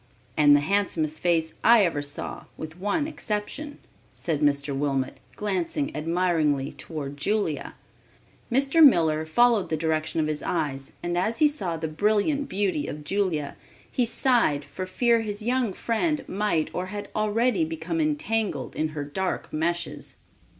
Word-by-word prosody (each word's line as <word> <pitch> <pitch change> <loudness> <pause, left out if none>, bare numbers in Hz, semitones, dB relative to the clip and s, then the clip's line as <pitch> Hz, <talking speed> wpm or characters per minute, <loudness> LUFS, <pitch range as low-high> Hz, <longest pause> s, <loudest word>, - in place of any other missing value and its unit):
"And 145 -1 +6
the 145 - +4
handsomest 160 -3 0
face 165 -2 +1
I 230 -3 +7
ever 155 -4 -1
saw 145 0 -4
with 160 +2 -8
one 250 - 0
exception," 290 +1 -4 0.4
said 160 -4 -1
Mr. 140 -1 +1
Wilmot, 135 -2 -1 0.2
glancing 210 - -2
admiringly 160 -4 +1
toward 145 -3 -6
Julia. 180 -1 -1 0.8
Mr. 275 +6 +4
Miller 160 - +5
followed 225 0 +3
the 160 - 0
direction 160 0 -1
of 155 - +2
his 155 -1 -2
eyes 135 -5 -2
and 175 0 -1
as 215 +5 0
he 310 - +6
saw 190 - -3
the 160 0 -3
brilliant 215 - +1
beauty 190 -7 0
of 150 0 -6
Julia, 160 -4 -1 0.4
he 245 -2 +1
sighed 230 - +2
for 185 0 -6
fear 235 +5 +2
his 210 -1 -4
young 245 -1 +1
friend 290 - -1
might 190 -5 0
or 180 +1 -3
had 205 +1 -6
already 215 -2 +2
become 165 +1 -2
entangled 155 - -1
in 155 - 0
her 145 - -1
dark 185 +6 -3
meshes. 170 +2 -2
175 Hz, 150 wpm, -26 LUFS, 155-215 Hz, 0.8 s, I